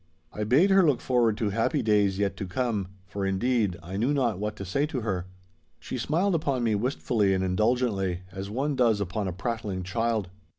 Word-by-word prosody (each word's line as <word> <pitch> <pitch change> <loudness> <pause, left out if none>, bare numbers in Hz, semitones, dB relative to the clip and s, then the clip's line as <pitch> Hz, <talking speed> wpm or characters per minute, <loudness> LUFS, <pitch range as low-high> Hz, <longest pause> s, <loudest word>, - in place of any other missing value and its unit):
I 105 - -2
bade 145 - +4
her 195 0 +7
look 145 -9 +3
forward 120 -5 +2
to 105 -3 0
happy 115 +8 0
days 105 -3 +3
yet 100 -1 0
to 95 - -4
come, 105 -1 -1 0.2
for, 100 +1 -5
indeed, 100 0 +1
I 95 +3 -5
knew 125 +8 +1
not 120 -8 +1
what 105 0 -3
to 100 - -7
say 140 +11 0
to 140 -5 -3
her. 95 -5 -2 0.5
She 130 - -5
smiled 170 - +1
upon 140 -6 0
me 115 -2 +2
wistfully 105 -3 +1
and 95 - 0
indulgently, 95 -2 +1
as 95 +1 -6
one 135 +6 -1
does 115 -5 +3
upon 100 +1 -2
a - - -1
prattling 100 -1 -3
child. 110 0 -1
110 Hz, 200 wpm, -27 LUFS, 95-125 Hz, 0.5 s, her